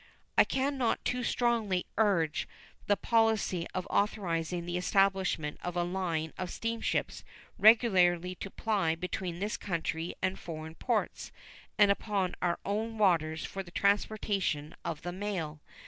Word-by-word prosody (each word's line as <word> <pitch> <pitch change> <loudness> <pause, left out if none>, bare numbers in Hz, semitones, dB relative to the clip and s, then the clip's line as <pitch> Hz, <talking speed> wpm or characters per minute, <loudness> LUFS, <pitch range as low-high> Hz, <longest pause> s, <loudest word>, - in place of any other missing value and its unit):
I - - +7
can 270 +1 -1
not 240 -3 0
too 250 0 0
strongly 230 -7 +1
urge 185 -8 +2 0.4
the 205 - +3
policy 220 -7 +2
of 185 - -2
authorizing 175 -4 0
the 175 0 -3
establishment 190 -4 +1
of 180 0 -4
a 175 - +2
line 175 -3 -2
of 185 - -3
steamships 230 +3 -2 0.4
regularly 185 -6 +5
to 195 - -7
ply 195 -7 0
between 180 0 -4
this 205 +3 -2
country 165 -2 -3
and 185 0 -1
foreign 160 -1 -7
ports 225 +5 -2 0.5
and 205 -1 +6
upon 200 -3 0
our 175 -1 +1
own 220 +3 -2
waters 160 -6 +2
for 195 - -5
the 185 - -11
transportation 200 -6 0
of 165 -3 -4
the 175 - -3
mail. 175 -6 -4
185 Hz, 140 wpm, -31 LUFS, 170-210 Hz, 0.5 s, I